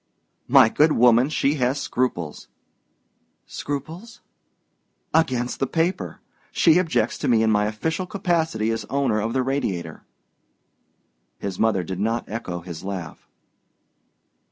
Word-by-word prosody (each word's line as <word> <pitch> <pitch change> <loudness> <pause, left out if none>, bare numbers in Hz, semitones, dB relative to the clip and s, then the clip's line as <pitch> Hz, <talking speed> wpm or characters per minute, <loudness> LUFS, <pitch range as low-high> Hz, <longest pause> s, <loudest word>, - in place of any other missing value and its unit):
"My - - +7
good 150 +7 +3
woman, 120 +2 +5
she 150 -1 +1
has 130 +3 +1
scruples." 90 -12 -2 1.0
"Scruples?" 165 - -6 0.9
"Against 130 -6 +1
the 135 - 0
paper. 170 +6 -2 0.3
She 165 0 +4
objects 165 -3 0
to - - -2
me 115 -2 +4
in 110 - +3
my 105 0 +2
official 160 - -2
capacity 165 - 0
as 115 0 -2
owner 130 -5 0
of 115 +2 -2
the 130 - +1
Radiator." 95 - -3 1.4
His 95 -2 -5
mother 110 -5 +2
did 95 +1 -5
not 115 +3 -1
echo 95 -6 -5
his 85 -1 -8
laugh. 95 -5 -7
120 Hz, 125 wpm, -23 LUFS, 105-155 Hz, 1.4 s, My